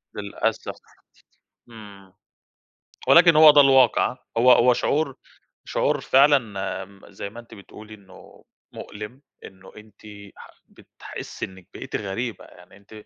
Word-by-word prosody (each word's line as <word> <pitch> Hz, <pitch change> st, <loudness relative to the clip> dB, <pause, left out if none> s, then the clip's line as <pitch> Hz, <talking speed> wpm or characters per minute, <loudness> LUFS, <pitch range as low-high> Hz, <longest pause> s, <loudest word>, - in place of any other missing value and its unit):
للأسف، -, -, -4 dB, 0.9 s
امم. 100 Hz, -4 st, -15 dB, 0.9 s
ولكن 170 Hz, -1 st, +6 dB
هو 155 Hz, -1 st, +8 dB
ده 145 Hz, -1 st, +6 dB
الواقع، 135 Hz, -3 st, +3 dB
ها؟ 125 Hz, -, -14 dB, 0.2 s
هو 125 Hz, +2 st, +5 dB
هو 125 Hz, +1 st, +4 dB
شعور 140 Hz, +1 st, -2 dB, 0.5 s
شعور -, -, -1 dB
فعلًا 140 Hz, +2 st, +4 dB, 0.5 s
امم، 100 Hz, 0 st, -18 dB
زي 100 Hz, +1 st, -8 dB
ما 115 Hz, +3 st, -12 dB
أنتِ 115 Hz, -1 st, -15 dB
بتقولي، 110 Hz, +1 st, -14 dB
إنّه 95 Hz, -3 st, -18 dB, 0.3 s
مؤلم، 105 Hz, +6 st, -10 dB, 0.2 s
إنه 95 Hz, 0 st, -15 dB
أنتِ 105 Hz, -1 st, -18 dB, 0.4 s
ح -, -, -14 dB, 0.2 s
بتحسي -, -, -10 dB
إنِّك 95 Hz, -2 st, -17 dB
بقيتِ -, -, -8 dB
غريبة. 110 Hz, +4 st, -5 dB
يعني 90 Hz, +2 st, -19 dB
أنتِ، 105 Hz, +1 st, -16 dB
110 Hz, 130 wpm, -22 LUFS, 100-130 Hz, 0.9 s, هو